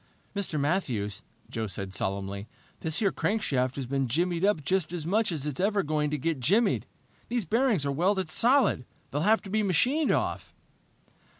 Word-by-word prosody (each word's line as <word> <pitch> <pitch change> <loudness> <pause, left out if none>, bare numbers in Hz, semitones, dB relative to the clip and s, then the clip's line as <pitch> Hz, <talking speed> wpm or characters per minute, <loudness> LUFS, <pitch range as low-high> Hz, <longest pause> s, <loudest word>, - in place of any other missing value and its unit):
"Mr. 190 -6 -1
Matthews," 130 - -1 0.3
Joe 110 -1 -3
said 95 0 -5
solemnly, 100 +1 -3 0.3
"this 160 -1 -1
here 200 -3 +2
crankshaft 135 - 0
has 135 - -3
been 135 +1 -1
jimmied 170 +7 0
up 195 -7 +2
just 185 0 0
as 170 -3 -4
much 210 +4 +1
as 150 -4 -3
it's 145 -3 -4
ever 200 +1 +2
going 150 -1 0
to 150 - -1
get 160 +1 -1
jimmied. 200 - +2 0.4
These 240 -4 -1
bearings 225 - +2
are 140 - 0
welded 185 +6 +1
solid. 240 - +3 0.2
They'll 145 - -1
have 215 +5 +3
to 195 - -8
be 215 +1 +2
machined 250 - +2
off!" - - -1
165 Hz, 175 wpm, -28 LUFS, 135-205 Hz, 0.4 s, solid